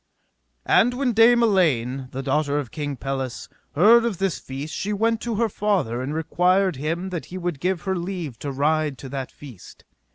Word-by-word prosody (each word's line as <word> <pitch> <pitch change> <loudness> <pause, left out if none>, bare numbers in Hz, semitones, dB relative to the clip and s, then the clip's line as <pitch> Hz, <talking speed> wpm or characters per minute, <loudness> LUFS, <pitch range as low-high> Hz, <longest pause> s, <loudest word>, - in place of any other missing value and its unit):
And 245 +2 +4
when 255 -2 0
Dame 235 +2 +6
Elaine, 135 - +1
the 135 0 -5
daughter 145 +1 0
of 140 -5 -4
King 145 -2 -4
Pelles, 135 -3 -4 0.3
heard 225 +9 +6
of 230 -6 -1
this 195 -2 -1
feast 140 +4 -7
she 205 - -3
went 225 +2 +1
to 235 -2 -2
her 230 +2 +2
father 185 - -1
and 130 +3 -3
required 180 +3 +1
him 165 +6 -3
that 170 -3 -4
he 185 - -8
would 175 -5 -3
give 180 0 -1
her 190 -1 -1
leave 170 -8 -5
to 140 - -4
ride 150 +1 0
to 135 - -9
that 135 -1 -5
feast. 125 -10 -13
160 Hz, 190 wpm, -23 LUFS, 135-195 Hz, 0.3 s, Dame